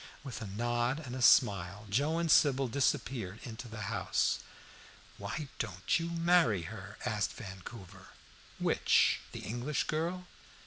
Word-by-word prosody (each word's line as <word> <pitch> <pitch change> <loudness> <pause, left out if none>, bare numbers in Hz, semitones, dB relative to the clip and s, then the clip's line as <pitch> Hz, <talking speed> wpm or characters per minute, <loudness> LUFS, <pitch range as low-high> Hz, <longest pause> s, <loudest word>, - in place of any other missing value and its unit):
With 130 -4 -6
a 110 - -5
nod 120 +5 0
and 125 0 -6
a 130 - -4
smile 100 -4 +4
Joe 140 +11 +1
and 170 -2 +1
Sybil 135 -2 +5
disappeared 120 -5 -1
into 120 +1 -7
the 110 -1 -7
house. - - 0 0.8
"Why 150 -2 -4
don't 100 - 0
you 165 0 -3
marry 170 - +3
her?" - - -8
asked - - 0
Vancouver. 95 0 -10 0.5
"Which? - - +3
The - - -7
English 120 +6 -2
girl?" 170 +4 -2
120 Hz, 135 wpm, -32 LUFS, 105-150 Hz, 0.8 s, Sybil